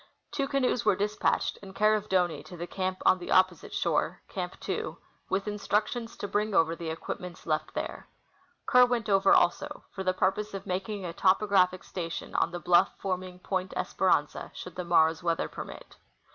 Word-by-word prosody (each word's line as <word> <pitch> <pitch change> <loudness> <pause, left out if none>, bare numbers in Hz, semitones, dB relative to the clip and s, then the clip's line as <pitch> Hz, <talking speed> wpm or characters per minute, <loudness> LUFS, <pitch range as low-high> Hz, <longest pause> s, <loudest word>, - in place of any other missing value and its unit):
Two 275 -2 -1
canoes 260 -3 +1
were 210 -3 +4
dispatched, 210 +2 0
in 195 -1 -12
care 215 +1 +4
of 215 -1 -1
Doney, 180 -3 +1
to 180 - -10
the 170 - -4
camp 185 +1 -3
on 185 - +5
the 175 - -8
opposite 185 -3 +3
shore - - 0
(Camp - - -5
2), - - -3 0.3
Avith 195 +1 0
instructions 210 +3 -1
to 205 - -4
bring 210 0 0
over 165 0 +3
the 165 -1 -5
equi23ments 175 +2 -6
left 155 -1 -1
there. - - -4 0.6
Kerr 250 -1 +6
went 235 -3 -1
over 195 -1 +4
also 295 +12 +2
for 190 - -5
the 185 - +2
purpose 195 +3 0
of 195 - -6
making 190 +2 -3
a 170 - -4
topographic 185 -1 +3
station 170 -2 -5
on - - +2
the 175 0 -5
bluff' 175 +2 +3
forming 185 -1 -3
Point 185 0 -3
Espe - - -4
ranza 145 -3 +1
should 180 - -8
the 180 - -3
morrow's 160 -2 +3
weather 170 -1 0
permit. - - -9
190 Hz, 185 wpm, -29 LUFS, 175-210 Hz, 0.6 s, Kerr